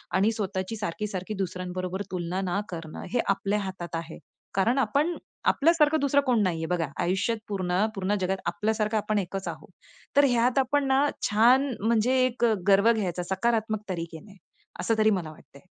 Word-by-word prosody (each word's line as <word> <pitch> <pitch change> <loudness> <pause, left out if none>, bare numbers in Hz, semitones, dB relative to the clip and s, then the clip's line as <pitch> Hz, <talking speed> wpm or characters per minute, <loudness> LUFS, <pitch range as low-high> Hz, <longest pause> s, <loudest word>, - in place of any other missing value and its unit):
आणि 200 +4 +3
स्वतःची 195 -1 -3
सारखी-सारखी 205 0 -4
दुसऱ्यांबरोबर 185 +1 -4
तुलना 180 +1 -2
ना 200 - 0
करणं 165 -3 -7
हे 245 - +2
आपल्या 200 +1 +1
हातात 190 -4 -5
आहे, 165 0 -6 0.4
कारण 225 +7 +2
आपण 285 +8 +1 0.3
आपल्यासारखं 315 0 +4
दुसरं 285 0 +3
कोण 245 -4 +3
नाही 180 -3 0
आहे. 160 - -3
बघा, 165 -4 -1 0.2
आयुष्यात 190 +6 0
पूर्ण 185 0 0
पूर्ण 195 +1 0
जगात 190 +1 0
आपल्यासारखं 215 +3 0
आपण 210 0 0
एकच 195 0 -4
आहोत. - - -9 0.5
तर 285 - +7
ह्यात 245 0 +2
आपण 275 +2 +1
ना 270 +2 +3 0.2
छान 245 +6 +5
म्हणजे 230 +3 +2
एक 245 -1 0
अ, 225 - +4
गर्व 200 +3 +6
घ्यायचा 180 -5 -2
सकारात्मक 220 0 0
तरीके 165 -3 -4
ने. 205 -1 -16 0.4
असं 225 - +1
तरी 215 - +5
मला 175 -6 -2
वाटतंय. 140 -1 -18
205 Hz, 165 wpm, -27 LUFS, 185-235 Hz, 0.5 s, तर